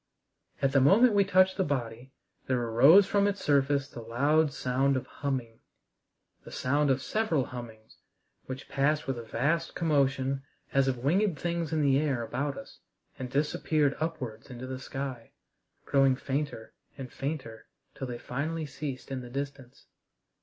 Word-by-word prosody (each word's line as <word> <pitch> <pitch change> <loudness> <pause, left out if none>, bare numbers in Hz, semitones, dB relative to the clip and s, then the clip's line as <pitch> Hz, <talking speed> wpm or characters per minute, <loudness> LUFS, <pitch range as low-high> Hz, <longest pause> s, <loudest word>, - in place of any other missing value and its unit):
At 135 - +3
the 140 -1 +4
moment 215 - +6
we 200 -1 +5
touched 185 0 +3
the 190 - +2
body 125 -4 -3 0.4
there 130 -1 +1
arose 130 - +6
from 200 +1 +2
its 200 -1 -1
surface 140 -1 +2
the 130 - -10
loud 140 +7 +2
sound 130 +2 +1
of 130 - -4
humming 130 -5 -4 0.8
the - - -11
sound 145 +3 +1
of 135 0 +1
several 170 - 0
hummings 115 -3 -10 0.5
which 130 +1 -7
passed 150 +3 +1
with 135 -3 -2
a - - -7
vast 145 +9 -1
commotion 140 -4 +1 0.3
as 135 -1 +3
of 130 -1 0
winged 180 +4 +2
things 170 0 -2
in 155 -2 +1
the 135 -1 +4
air 140 -6 0
about 140 +4 -3
us - - -11 0.4
and 130 -1 -4
disappeared 150 +1 +1
upwards 130 -9 -4
into 125 0 -7
the 130 0 -5
sky, 135 -4 -6 0.5
growing 135 -2 +4
fainter 140 -3 -4 0.2
and 130 -2 -8
fainter 135 -6 -5 0.3
till 130 - -6
they 120 -1 -5
finally 155 +7 -3
ceased 140 -2 -6
in 130 -1 -3
the 125 - -9
distance. 135 -1 -6
140 Hz, 160 wpm, -29 LUFS, 130-155 Hz, 0.8 s, moment